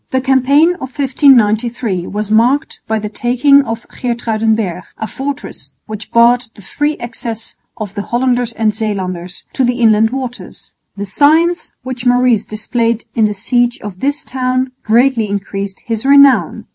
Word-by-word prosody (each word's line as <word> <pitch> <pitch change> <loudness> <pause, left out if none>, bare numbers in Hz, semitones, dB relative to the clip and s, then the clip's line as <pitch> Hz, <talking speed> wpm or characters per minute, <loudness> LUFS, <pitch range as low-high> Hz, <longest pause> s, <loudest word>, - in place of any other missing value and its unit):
The 260 - 0
campaign 270 +5 +3
of 260 -8 -9
1593 235 - +2
was 210 +1 -4
marked 250 +8 +2
by 220 - 0
the 210 -1 -4
taking 250 +6 +3
of 230 -3 -6
Geertruidenberg, 220 -6 -1 0.2
a 220 - -4
fortress 275 +5 -7
which 215 0 -8
barred 240 +1 +4
the 205 - -15
free 295 +8 -2
access 230 -1 -7 0.2
of 205 -3 -6
the 205 - -4
Hollanders 245 +1 0
and 220 -1 0
Zeelanders 185 -5 -4
to 265 - 0
the 245 0 +1
inland 220 -2 +3
waters. 250 -6 -7 0.2
The 200 - -4
science 315 - +2
which 255 -1 -4
Maurice 245 -3 +3
displayed 230 +1 -2
in 225 - +2
the 210 -1 -1
siege 240 +3 0
of 200 -3 -8
this 285 +5 -2
town 255 0 -1
greatly 230 -1 +2
increased 200 -1 -5
his 225 -2 -3
renown. 280 0 +4
235 Hz, 150 wpm, -15 LUFS, 215-260 Hz, 0.2 s, barred